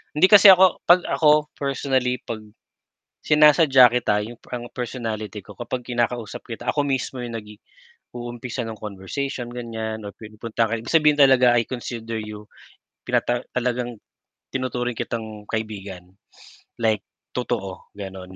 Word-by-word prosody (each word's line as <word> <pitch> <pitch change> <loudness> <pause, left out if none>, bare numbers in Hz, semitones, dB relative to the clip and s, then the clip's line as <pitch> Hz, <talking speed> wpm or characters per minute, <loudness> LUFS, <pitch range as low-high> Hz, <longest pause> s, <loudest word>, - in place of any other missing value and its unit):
Hindi 165 +5 +6
kasi 205 0 +8
ako 185 -1 +5
'pag 175 +1 +6
ako 150 -1 +3
personally 130 -2 -1
'pag 110 -2 -7 0.8
sinasadya 150 -4 +6
kita, 120 -3 +1
'yung 115 +2 -9
parang 120 -1 -7
personality 115 -4 -5
ko - - -13
kapag 125 +1 -5
kinakausap 120 -2 -2
kita 115 -2 -8
ako 145 - 0
mismo 130 -1 -2
'yung 120 -1 -6
nagi 105 -1 -8 0.6
uumpisa 120 +1 -5
ng 110 -2 -7
conversation 120 +6 -5
ganiyan 110 -3 -5
or 100 - -10
pinupuntahan 110 +1 -3
ka - - +1
ibig 115 - -11
sabihin 150 -2 +4
talaga 130 -3 +6
I 120 -1 +2
consider 115 -2 -5
you, 105 -1 -7 0.6
pinata 120 0 0
talagang 125 -1 -1 0.6
tinuturing 125 -2 -2
kitang 110 -2 -6
kaibigan, 100 -5 -5 0.6
like 110 -2 +1 0.3
totoo, 105 -7 -4
gano'n. 95 -2 -8
120 Hz, 135 wpm, -23 LUFS, 110-130 Hz, 0.8 s, kasi